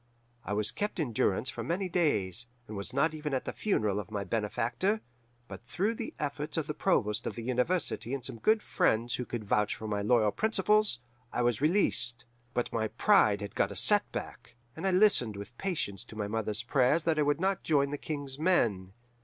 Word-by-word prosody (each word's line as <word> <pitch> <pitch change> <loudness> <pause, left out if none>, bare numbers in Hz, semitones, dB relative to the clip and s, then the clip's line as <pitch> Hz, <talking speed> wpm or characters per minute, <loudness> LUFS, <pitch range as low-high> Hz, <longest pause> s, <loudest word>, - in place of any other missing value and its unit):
I 105 - -3
was 105 0 0
kept 210 -2 -3
in 135 -8 -1
durance 105 +4 +1
for - - -6
many 185 +3 -1
days, 115 - 0 0.2
and 110 - -7
was 100 +4 -5
not 140 +5 +1
even 150 -2 -3
at 130 - -2
the - - -4
funeral 105 - 0
of 105 - -7
my 105 -2 -3
benefactor; 115 - -1 0.5
but - - -9
through 195 +10 0
the 230 0 -6
efforts 150 +1 -3
of 160 - 0
the 150 - -3
provost 105 - 0
of - - -4
the 115 - -6
university 125 +2 0
and 130 - -6
some 115 - -2
good 220 - +3
friends 120 - +1
who 125 - -3
could 120 -2 -5
vouch 105 0 +1
for 110 - -7
my 105 -1 -1
loyal 110 0 +3
principles, 215 - +2 0.3
I 125 - 0
was 120 0 +1
released. 145 -9 +2 0.3
But 120 - -1
my 110 -1 0
pride 110 - +3
had 100 -1 -6
got 100 - +1
a - - -7
setback, 205 - +1 0.2
and 195 - -3
I - - +3
listened 180 - +4
with 100 +4 -9
patience 150 - -2
to 110 - -12
my 105 -1 -2
mother's 110 0 -2
prayers 130 +5 +2
that 160 -1 +1
I - - +4
would 145 0 +1
not 190 +1 0
join 140 -3 +2
the 145 - -2
King's 145 -3 -5
men. 110 - +1
125 Hz, 205 wpm, -30 LUFS, 110-170 Hz, 0.5 s, listened